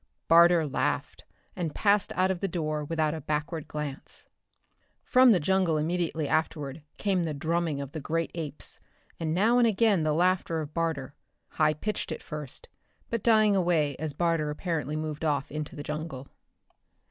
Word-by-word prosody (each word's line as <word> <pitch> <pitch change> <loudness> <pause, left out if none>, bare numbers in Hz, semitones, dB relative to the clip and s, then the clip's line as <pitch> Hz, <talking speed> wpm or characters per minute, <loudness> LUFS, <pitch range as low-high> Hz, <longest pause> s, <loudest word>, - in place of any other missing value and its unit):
Barter 170 0 +6
laughed 145 - -2 0.3
and 165 -4 -3
passed 205 -1 +2
out 185 +1 +2
of 185 - -3
the 195 - -1
door 155 -4 -2
without 155 0 0
a 160 - -5
backward 150 +2 -3
glance. 150 -3 -6 0.8
From 255 -1 +6
the 190 - +4
jungle 180 -1 +2
immediately 160 -1 -1
afterward 155 -2 -1 0.2
came 195 -3 +1
the 160 -3 -2
drumming 160 0 -1
of 140 -1 -6
the 160 - -5
great 165 +3 -2
apes, 150 -4 -6 0.4
and 160 -2 -1
now 220 +8 +3
and 240 - +5
again 215 -3 +3
the 155 -1 +1
laughter 175 0 +1
of 150 -1 -6
Barter 160 -5 -2 0.4
high 155 -1 +2
pitched 210 +8 -3
at - - -5
first, 150 -4 -7 0.4
but 230 -2 -1
dying 215 -2 +4
away 165 -6 +2
as 155 0 -3
Barter 165 -2 +1
apparently 150 -2 -2
moved 155 0 -4
off 145 -3 0
into 150 0 -5
the 145 - -6
jungle. 150 -3 -5
160 Hz, 165 wpm, -28 LUFS, 150-180 Hz, 0.8 s, Barter